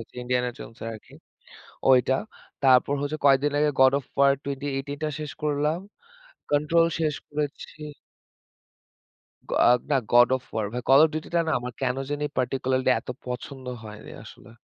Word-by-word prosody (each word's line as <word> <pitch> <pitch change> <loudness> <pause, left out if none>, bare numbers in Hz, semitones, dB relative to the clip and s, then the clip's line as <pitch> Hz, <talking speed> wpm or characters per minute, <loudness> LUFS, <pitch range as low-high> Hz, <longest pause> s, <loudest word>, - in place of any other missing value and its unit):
হচ্ছে 115 - -13
'Indiana 125 0 0
Jones' 115 - -11
এর 115 - -4
আরকি। 110 - -14 0.8
ওইটা। 130 0 +4 0.5
তারপর 130 +1 +5
হচ্ছে 145 +2 -2
কয়েকদিন 140 +1 +4
আগে 150 0 +3
'God 130 0 +6
of 135 - -14
War' 140 0 +5
2018 140 0 -4
টা 155 - 0
শেষ 150 -1 -5
করলাম। 150 +2 0 0.7
'কন্ট্রোল' 155 +3 +3
শেষ 155 -2 0
করেছি। 150 +1 -5 1.7
গ - - -6 0.4
না 140 - +4
'God 120 0 +7
of 130 - -18
War' 105 -2 -1
ভাই। 125 - -3
'Call 135 +3 +7
of - - -1
Duty' 155 +2 -5
টা - - +4
না - - +1
আমার 125 0 -6
কেনো 130 0 0
জানি 145 0 -2
particularly 130 0 0
এত - - -22 0.2
পছন্দ 130 +2 -6 0.2
হয়নি 105 0 -10
আসলে। 115 - -14
135 Hz, 160 wpm, -25 LUFS, 125-145 Hz, 1.7 s, God